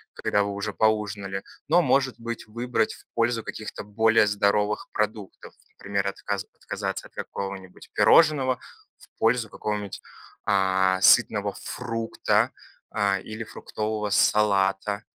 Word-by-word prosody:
когда 100 0 +1
вы 100 - -3
уже 100 +2 -4
поужинали, 105 -3 0 0.3
но, 175 +3 +5
может 135 -5 +1
быть, 115 0 -5
выбрать 115 0 -1
в - - -16
пользу 115 -1 +1
каких-то 110 - -7
более 110 +1 +3
здоровых 105 0 +1
продуктов, 105 -2 -4 0.2
например, 100 0 -3
отказа 100 0 -3
отказаться - - -4
от - - -34
какого-нибудь 95 -2 -7
пирожного 135 -5 +5 0.4
в - - -17
пользу 115 -1 +2
какого-нибудь, 105 -2 -4 0.4
а, 95 -1 +2
сытного - - +5
фрукта, 115 -2 0 0.4
а, 100 -2 +1
или 110 +2 -6
фруктового 105 -1 -4
салата. 100 0 +2
105 Hz, 120 wpm, -25 LUFS, 100-115 Hz, 0.4 s, но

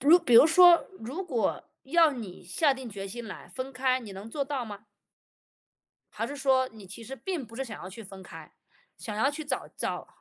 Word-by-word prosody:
如 310 +6 +7
比 260 -9 +1
如 255 - +10
说， 345 +1 +7
如 275 +12 -5
果 245 - -1 0.2
要 325 +3 +4
你 220 -11 -8
下 275 - +2
定 260 -2 -8
决 195 -2 -6
心 235 +3 -7
来 - - -9
分 265 +1 -5
开， 255 0 +1
你 215 -5 -9
能 200 +4 -9
做 280 +3 -2
到 270 -3 -3
吗？ 205 -2 -8 1.3
还 - - -3
是 285 - -6
说， 265 -2 +2
你 215 -3 -12
其 200 +5 -10
实 265 - -7
并 350 -5 -4
不 225 - -14
是 270 - -2
想 225 -4 -8
要 185 - -7
去 210 +5 -10
分 195 -2 -11
开， 180 - -12 0.5
想 210 -2 -6
要 265 +6 +3
去 305 +2 -6
找 275 -3 -3
找 - - -3
255 Hz, 230 characters per minute, -28 LUFS, 215-285 Hz, 1.3 s, 如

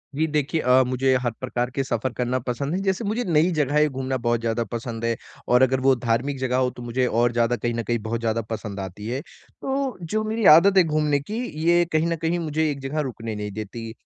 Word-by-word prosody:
जी, 155 - +2
देखिए 150 +1 0
अ, 130 +1 +5
मुझे 130 +1 +1
हर 120 -2 0
प्रकार 125 -1 -2
के 135 - +1
सफ़र 120 0 -2
करना 125 +1 -1
पसंद 140 +5 -2
है। - - 0
जैसे 190 +3 0
मुझे 225 +4 -1
नई 170 0 +3
जगहें 150 +2 +3
घूमना 130 0 -3
बहुत 120 -1 +2
ज़्यादा 115 0 -1
पसंद 115 -1 -4
है 115 0 +1 0.3
और 125 +1 +4
अगर 130 0 +2
वो 135 +1 +4
धार्मिक 125 +4 -1
जगह 130 -1 0
हो 130 -1 +2
तो 125 - -11
मुझे 125 +2 0
और 120 +1 +2
ज़्यादा 120 +1 +2
कहीं 120 0 -2
न 115 0 -2
कहीं 120 0 -1
बहुत 115 +2 -3
ज़्यादा 115 0 0
पसंद 105 -2 -5
आती 95 +2 -6
है। 130 +4 -2 0.4
तो 270 -1 -2
जो 215 +6 -2
मेरी 220 -1 -2
आदत 190 +3 +5
है 185 - +8
घूमने 150 -2 +1
की 205 +11 -6 0.3
ये 175 0 +5
कहीं 155 +1 +2
न 170 - 0
कहीं 165 +2 -1
मुझे 155 -1 0
एक 140 - -5
जगह 135 +3 -3
रुकने 115 -2 -6
नहीं 105 -1 -4
देती। 110 +2 -6
130 Hz, 235 wpm, -24 LUFS, 115-155 Hz, 0.4 s, है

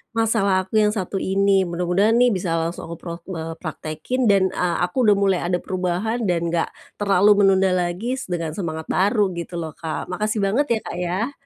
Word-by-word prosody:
masalah 200 -4 +2
aku 215 +3 +1
yang 210 - +4
satu 195 0 -3
ini. 195 +1 +1 0.2
Mudah-mudahan 180 +6 +1
nih 245 -1 +5
bisa 180 -3 -1
langsung 165 +1 -3
aku 170 - -6
prok 170 -1 -7
eee, 165 -2 -4
praktekkin 160 +10 -3
dan 200 -3 +4
e - - 0 0.2
aku 180 +5 -1
udah 210 - +6
mulai 190 -2 +2
ada 180 0 0
perubahan 185 +6 -2
dan 175 -3 +1
nggak 165 -1 0 0.3
terlalu 200 0 +3 0.2
menunda 190 0 +4
lagi 185 +8 -1
s 265 - -5
dengan 165 -2 -2
semangat 160 -4 -4
baru, 205 +1 +2
gitu 170 +1 -6
loh, 160 -1 -5
Kak. 160 +1 -5
Makasih 215 +4 -1
banget 210 +9 +2
ya, 220 - 0
Kak, 175 - -5
ya. 200 +10 -1
190 Hz, 195 wpm, -22 LUFS, 175-210 Hz, 0.3 s, udah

